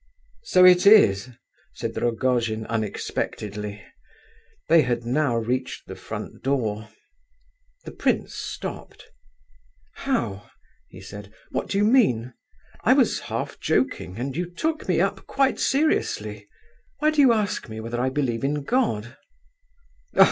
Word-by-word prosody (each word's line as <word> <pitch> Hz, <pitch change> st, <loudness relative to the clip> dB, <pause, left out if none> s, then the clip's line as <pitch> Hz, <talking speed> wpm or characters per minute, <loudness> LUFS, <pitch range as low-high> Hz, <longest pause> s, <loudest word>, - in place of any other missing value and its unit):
"So 185 Hz, -, +5 dB
it 180 Hz, +1 st, +7 dB
is!" 130 Hz, -, +6 dB, 0.4 s
said -, -, -5 dB
Rogojin, 115 Hz, -2 st, 0 dB
unexpectedly. 105 Hz, -1 st, -4 dB, 0.8 s
They 165 Hz, 0 st, +6 dB
had 120 Hz, -3 st, -1 dB
now 130 Hz, 0 st, +1 dB
reached 125 Hz, +3 st, -2 dB
the -, -, -8 dB
front -, -, -8 dB
door. 110 Hz, -6 st, -1 dB, 1.0 s
The -, -, -7 dB
prince -, -, -1 dB
stopped. -, -, -7 dB, 0.8 s
"How?" 115 Hz, -, -2 dB, 0.4 s
he 95 Hz, -, -13 dB
said. 100 Hz, +1 st, -10 dB, 0.2 s
"What 130 Hz, -, -3 dB
do 195 Hz, -, -1 dB
you 205 Hz, -, +3 dB
mean? 130 Hz, -, +3 dB, 0.5 s
I -, -, +6 dB
was -, -, +3 dB
half -, -, -4 dB
joking, 90 Hz, +2 st, -1 dB
and 130 Hz, +3 st, -4 dB
you 175 Hz, +1 st, -2 dB
took 310 Hz, -, -3 dB
me -, -, +2 dB
up -, -, -1 dB
quite 275 Hz, -1 st, +1 dB
seriously! 310 Hz, +3 st, 0 dB, 0.5 s
Why 305 Hz, 0 st, +2 dB
do 310 Hz, -1 st, +3 dB
you 265 Hz, -3 st, +7 dB
ask 210 Hz, -, -1 dB
me 110 Hz, 0 st, -6 dB
whether 115 Hz, +2 st, -3 dB
I 130 Hz, -, +1 dB
believe 130 Hz, -4 st, -1 dB
in 145 Hz, +1 st, -1 dB
God?" 135 Hz, -, 0 dB
130 Hz, 130 wpm, -24 LUFS, 110-185 Hz, 1.0 s, it